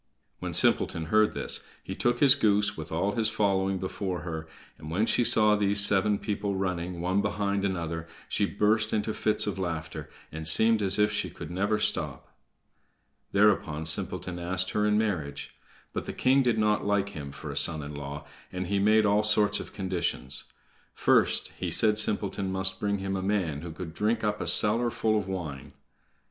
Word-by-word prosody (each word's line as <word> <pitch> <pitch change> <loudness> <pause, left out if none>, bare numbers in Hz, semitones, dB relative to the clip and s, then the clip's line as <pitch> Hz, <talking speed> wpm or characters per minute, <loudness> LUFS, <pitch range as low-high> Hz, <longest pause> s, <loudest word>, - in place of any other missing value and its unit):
When - - -4
Simpleton 80 -1 +1
heard 110 0 +4
this - - -2 0.2
he - - -6
took 120 0 0
his 140 -2 +8
goose, 105 -5 +1
with 80 -2 -8
all 90 +5 0
his 110 0 +1
following, 95 -2 0
before 95 -1 -4
her, 80 -2 -6 0.3
and 75 0 -9
when 95 +7 +1
she 120 - +2
saw 105 -2 +5
these 100 0 +1
seven 100 +1 +4
people 100 -1 -3
running, 90 -2 -3
one 95 +3 +1
behind 100 -1 -1
another, 85 -4 -3 0.2
she 100 - 0
burst 110 +2 +1
into 110 0 -1
fits 110 - +1
of 100 -2 -3
laughter, 80 -4 -5 0.2
and 80 +1 -4
seemed 110 +6 +5
as 100 0 +3
if 105 0 +3
she 105 - -1
could - - -9
never 100 +4 0
stop. 105 0 -1 1.0
Thereupon 100 -7 +2
Simpleton 90 +2 -2
asked 90 +2 -1
her 105 0 +1
in 105 0 +2
marriage. 90 -10 -3 0.4
But - - -4
the - - -5
king 130 +2 +3
did 120 -4 +1
not 105 -1 +1
like 100 -1 0
him 75 -7 -8
for 70 - -8
a - - -7
son 80 -2 -1
in 75 +1 -7
law, 70 +1 -7 0.3
and 90 0 -4
he 100 +2 -1
made 110 +2 +4
all 105 +1 +3
sorts 105 -1 +2
of - - -8
conditions. 95 -9 -2 0.5
First, - - +2
he - - -2
said 110 -1 +3
Simpleton 100 -2 -1
must 95 0 0
bring 100 -1 -1
him 95 0 -3
a 95 - -2
man 95 -7 -1
who 85 0 -7
could 80 0 -8
drink 110 +5 -1
up 105 0 -1
a - - -3
cellar 115 +3 +3
full 110 -1 0
of 100 - -6
wine. 80 -9 -6
100 Hz, 185 wpm, -27 LUFS, 90-105 Hz, 1.0 s, his